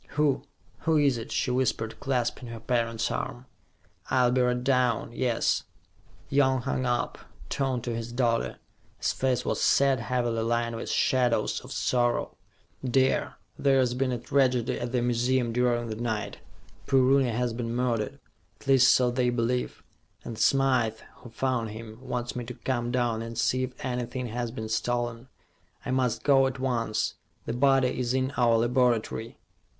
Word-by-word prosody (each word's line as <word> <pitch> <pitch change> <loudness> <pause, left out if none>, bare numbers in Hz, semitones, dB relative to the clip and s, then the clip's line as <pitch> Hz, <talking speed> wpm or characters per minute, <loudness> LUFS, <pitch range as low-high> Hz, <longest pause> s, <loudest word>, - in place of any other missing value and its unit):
"Who 145 -3 +2 0.4
who 160 -1 +2
is 140 -5 +3
it?" 115 - -8
she 125 - 0
whispered, 125 -3 -1
clasping 125 -2 -1
her 115 -1 -7
parent's 115 -1 -1
arm. 120 +1 -4 0.6
"I'll 125 -2 +3
be 130 0 +2
right 125 0 +1
down, 125 -4 +1
yes." 120 -2 +1 0.6
Young 130 -2 +2
hung 130 -1 -1
up, 120 0 -1 0.3
turned 130 -4 -1
to 120 -2 -3
his 115 +1 -5
daughter. 120 -2 0 0.4
His - - 0
face 130 -2 0
was - - -1
sad, 135 -2 +4
heavily 120 -1 -1
lined 115 0 0
with 115 - -5
shadows 125 -2 +1
of - - -12
sorrow. 120 -1 0 0.5
"Dear, 130 +1 +1 0.2
there's 130 -3 +3
been 130 +1 0
a 125 - -1
tragedy 125 -1 +1
at 120 0 -4
the 125 -2 +1
museum 120 0 +1
during 120 -1 +1
the 110 - -4
night. 110 -2 -3 0.5
Poor 135 -2 +4
Rooney 130 0 +4
has 120 +1 -1
been 115 0 -3
murdered 120 -4 -1 0.4
at - - -17
least 135 -1 +6
so 125 -1 +3
they 125 0 +1
believe 120 +1 -1 0.4
and 115 - -6
Smythe, 125 -3 +3 0.2
who 120 - -12
found 120 -1 -1
him, 110 +1 -9
wants 125 -2 -4
me 125 - -3
to 125 - -7
come 120 -2 -2
down 120 -2 0
and 115 0 -6
see 130 +2 +1
if 130 0 -5
anything 125 0 -3
has 120 +1 -3
been 110 -1 -6
stolen. 120 +2 -2 0.6
I - - -2
must 130 -3 0
go 135 -2 +5
at 130 0 -4
once. 120 -4 -1 0.3
The - - -3
body 135 0 +3
is 125 0 0
in 130 +1 0
our 120 -2 +4
laboratory." 120 -1 +1
125 Hz, 165 wpm, -27 LUFS, 115-130 Hz, 0.6 s, least